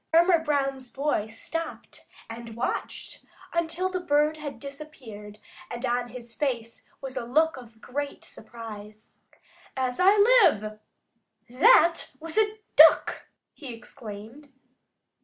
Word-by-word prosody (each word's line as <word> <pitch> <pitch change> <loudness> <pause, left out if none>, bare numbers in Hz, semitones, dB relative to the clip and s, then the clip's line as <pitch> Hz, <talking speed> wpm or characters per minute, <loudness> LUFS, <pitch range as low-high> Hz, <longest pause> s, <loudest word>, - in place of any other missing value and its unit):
Farmer 340 +1 +5
Brown's 275 -4 -1
boy 275 -4 -1
stopped 330 +9 -7 0.2
and 230 0 -9
watched 235 - -4 0.3
until 340 +2 0
the 370 -1 -3
bird 300 -2 +2
had 290 -5 -7
disappeared, 255 -7 -10 0.3
and 240 +2 -4
on 245 0 0
his 240 -1 -10
face 230 -2 -3
was 265 -1 -7
a - - -3
look 310 +7 +2
of 230 -3 -13
great 285 +2 -5
surprise. 215 -2 -11 0.7
"As 255 -1 -1
I 390 +3 +6
live, 380 - +4 0.7
that 335 - +5
was 325 0 -7
a 430 0 +1 0.2
Duck!" 315 +1 +6 0.3
he 275 -5 -9
exclaimed. 230 +4 -10
270 Hz, 120 wpm, -26 LUFS, 230-320 Hz, 0.7 s, I